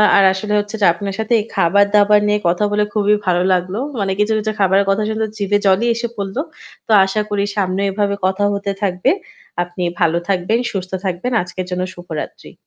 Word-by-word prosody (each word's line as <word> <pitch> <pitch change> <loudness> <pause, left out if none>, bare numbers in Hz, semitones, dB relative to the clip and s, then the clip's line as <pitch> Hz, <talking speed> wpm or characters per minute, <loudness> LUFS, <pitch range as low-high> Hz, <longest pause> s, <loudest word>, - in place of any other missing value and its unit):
আর 200 - +6
আসলে 210 +2 -3
হচ্ছে 205 +2 -4
যে - - +5
আপনার 195 +3 -5
সাথে 220 +2 0 0.2
খাবার 200 +4 +4
দাবার 210 0 +5
নিয়ে 210 0 +2
কথা 175 +4 +1
বলে 210 0 +2
খুবই 210 0 +3
ভালো 175 -1 +2
লাগলো। 185 +2 -1 0.2
মানে 195 -1 0
কিছু, 210 +1 +2
কিছু 215 0 -2
খাবারের 195 +1 +3
কথা 205 +2 +1
শুনতে 220 0 -1
জিভে 205 0 +1
জলই 195 +5 +3
এসে 235 0 -2
পড়ল। 195 0 -4 0.5
তো - - -2
আশা 200 +2 -1
করি 200 -1 0
সামনে 190 0 0
এভাবে 200 0 0
কথা 190 +2 0
হতে 200 0 -2
থাকবে। 180 -2 +1 0.5
আপনি 175 +1 -9 0.2
ভালো 165 +1 +2
থাকবেন, 195 +5 +1
সুস্থ 185 -2 -5
থাকবেন। 185 +7 -2
আজকের 180 +1 -6
জন্য 180 0 -2
শুভরাত্রি। 175 -3 -7
200 Hz, 190 wpm, -18 LUFS, 185-210 Hz, 0.5 s, আর